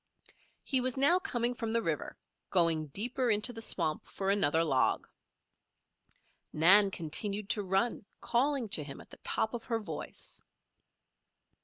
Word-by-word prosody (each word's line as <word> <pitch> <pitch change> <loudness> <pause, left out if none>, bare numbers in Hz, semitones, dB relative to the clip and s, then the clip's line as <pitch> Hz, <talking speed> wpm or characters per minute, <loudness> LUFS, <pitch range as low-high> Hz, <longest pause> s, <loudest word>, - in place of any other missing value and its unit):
He 260 -2 +1
was 255 +1 -2
now 290 +7 +4
coming 240 -7 -2
from 230 -2 -4
the 230 - +1
river, 160 -3 -3 0.3
going 165 -4 +2
deeper 245 - -1
into 215 +3 +2
the 225 - -7
swamp 160 -8 0
for 195 0 -2
another 165 -5 +2
log. 135 -5 0 1.4
Nan 195 +6 +6
continued 195 +4 0
to 210 - +1
run, 195 +4 -1
calling 265 0 0
to 155 - +2
him 140 -1 -9
at - - -15
the - - -12
top 220 - -1
of 235 -1 -6
her 230 -1 -1
voice. 210 - -7
210 Hz, 145 wpm, -31 LUFS, 165-240 Hz, 1.4 s, Nan